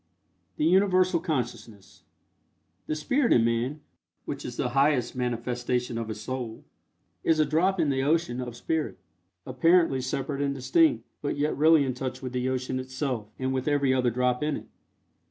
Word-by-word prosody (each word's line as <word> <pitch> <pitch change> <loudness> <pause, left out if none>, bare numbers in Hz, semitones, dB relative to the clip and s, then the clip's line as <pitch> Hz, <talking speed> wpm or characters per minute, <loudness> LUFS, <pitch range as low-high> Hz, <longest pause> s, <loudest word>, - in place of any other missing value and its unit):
THE 150 - +1
UNIVERSAL 185 0 +4
CONSCIOUSNESS. 120 - -5 0.9
The 155 - -1
Spirit 245 - +1
in 115 - +4
man, 120 +6 -1 0.4
which - - -5
is - - -7
the 125 - 0
highest 135 -2 +2
manifestation 125 0 -2
of 115 - -4
his 110 - -5
Soul, 125 -4 -5 0.6
is 160 -1 +2
a 155 - +5
drop 175 +6 +1
in 155 -4 +2
the 135 -1 0
ocean 145 -3 +1
of 120 -2 -6
Spirit, 160 +4 -2 0.5
apparently 165 +1 +3
separate 135 +2 -3
and 140 -1 0
distinct, 315 - +2 0.2
but 145 - -2
yet 150 +1 0
really 155 0 +5
in 130 - -1
touch 130 0 -4
with 130 -1 -6
the 125 0 -1
ocean 130 0 -2
itself, 130 -4 -3
and 130 0 -1
with 130 +1 -2
every 140 -3 +2
other 125 -1 +2
drop 125 +2 0
in 150 -1 0
it. - - -11
130 Hz, 170 wpm, -27 LUFS, 125-155 Hz, 0.9 s, a